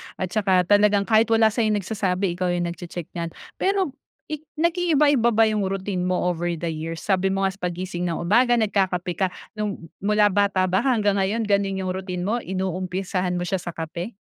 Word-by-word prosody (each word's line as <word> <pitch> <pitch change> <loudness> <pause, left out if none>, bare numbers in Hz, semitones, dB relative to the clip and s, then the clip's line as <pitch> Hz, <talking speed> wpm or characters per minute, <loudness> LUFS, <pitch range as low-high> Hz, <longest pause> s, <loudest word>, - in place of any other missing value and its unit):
at 185 -1 -4
saka 190 -4 +3
talagang 205 +1 +4
kahit 220 +1 +3
wala 225 -1 +4
sayong 215 -2 +1
nagsasabi 195 -2 -1
ikaw 180 +1 -2
yung 175 0 0
nag-che-check 175 -1 -8
niyan. 170 -1 -3 0.3
Pero 385 -6 +1 0.4
ik 305 0 -5
nag-iiba-iba 300 - +3
ba 225 - +6
yung 215 -3 +1
routine 195 -1 -3
mo 180 0 +1
over 175 0 -3
the 165 0 -3
years? 160 +1 -5
Sabi 195 -1 +1
mo 195 0 0
nga 190 - +2
sa 195 - -17
paggising 180 0 -3
ng 165 - -1
umaga 240 +6 +4
nagkakape 190 -5 0
ka, 190 - +3 0.2
nung 205 -6 -5
mula 210 0 +3
bata 200 -1 +2
ba 185 +1 +2
hanggang 210 -7 +2
ngayon 210 +4 0
gano'n 200 -2 0
yung 185 - -1
routine 185 -1 -4
mo? 225 +5 0
Inumpisahan 185 -1 -2
mo 175 - -1
siya 190 +1 -1
sa 175 0 -7
kape? 170 +6 -5
195 Hz, 190 wpm, -23 LUFS, 180-215 Hz, 0.4 s, ba